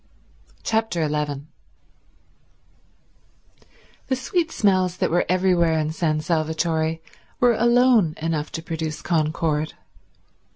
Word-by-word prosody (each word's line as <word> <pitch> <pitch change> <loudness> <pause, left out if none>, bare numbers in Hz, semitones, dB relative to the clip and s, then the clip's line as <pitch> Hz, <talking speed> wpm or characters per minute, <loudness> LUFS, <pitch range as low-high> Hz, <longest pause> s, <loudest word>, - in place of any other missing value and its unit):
Chapter 220 -7 0
11 150 -1 -2 2.6
The 260 - +1
sweet 325 +5 -1
smells 185 -3 +1
that - - 0
were 175 - +1
everywhere 180 -3 +2
in 155 0 -1
San 155 -2 0
Salvatore 160 0 0 0.4
were 245 -1 +5
alone 235 -7 +4
enough 155 -1 -2
to 165 - -5
produce 160 -2 -4
concord. 155 -2 0
165 Hz, 95 wpm, -23 LUFS, 155-190 Hz, 2.6 s, were